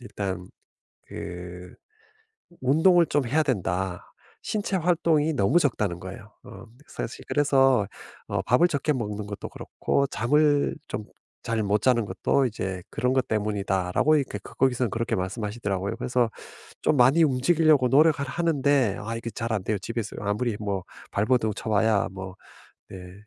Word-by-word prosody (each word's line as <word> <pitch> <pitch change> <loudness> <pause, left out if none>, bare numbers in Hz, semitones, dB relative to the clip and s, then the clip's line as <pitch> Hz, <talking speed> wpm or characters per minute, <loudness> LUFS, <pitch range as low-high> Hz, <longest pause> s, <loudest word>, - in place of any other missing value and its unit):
일단 100 -5 -5 0.6
그 90 +1 -8 0.9
"운동을 165 +6 +5
좀 140 -3 0
해야 155 +6 +2
된다. 95 - -2 0.4
신체 205 -2 -2
활동이 160 -3 +2
너무 115 - +3
적다."는 105 - 0
거예요. 100 +3 -10
어 - - -11 0.2
사실 115 - -6
그래서 135 -6 +3 0.4
어 - - -1
"밥을 170 +9 +4
적게 150 -1 0
먹는 105 -4 -4
것도 100 -1 -6
그렇고 140 - -1
잠을 145 +6 +2
좀 105 - -4 0.4
잘 115 -1 -1
못 105 0 +1
자는 120 -4 +3
것도 135 +5 +1
이제 95 -5 -4
그런 125 +1 0
것 130 -2 +1
때문이다."라고 100 +5 +1
이렇게 130 -8 -2
그 - - -13
거기서는 125 -3 +1
그렇게 115 +1 -2
말씀하시더라고요. 100 0 -3
그래서 120 -2 0 0.5
좀 150 - +2
많이 135 +7 +5
움직이려고 150 +1 +3
노력을 150 +2 +4
하는데 140 - +1
아 115 +2 -4
이게 115 0 -5
잘 115 0 -4
안 105 -4 -1
돼요. 105 0 -1
집에서 110 +1 -5
아무리 105 +2 -1
뭐 100 -3 -2 0.3
발버둥 110 +1 +1
쳐봐야 110 -1 +1
뭐 95 -1 -8 0.5
네 90 -1 -10
115 Hz, 310 characters per minute, -26 LUFS, 100-140 Hz, 0.9 s, 운동을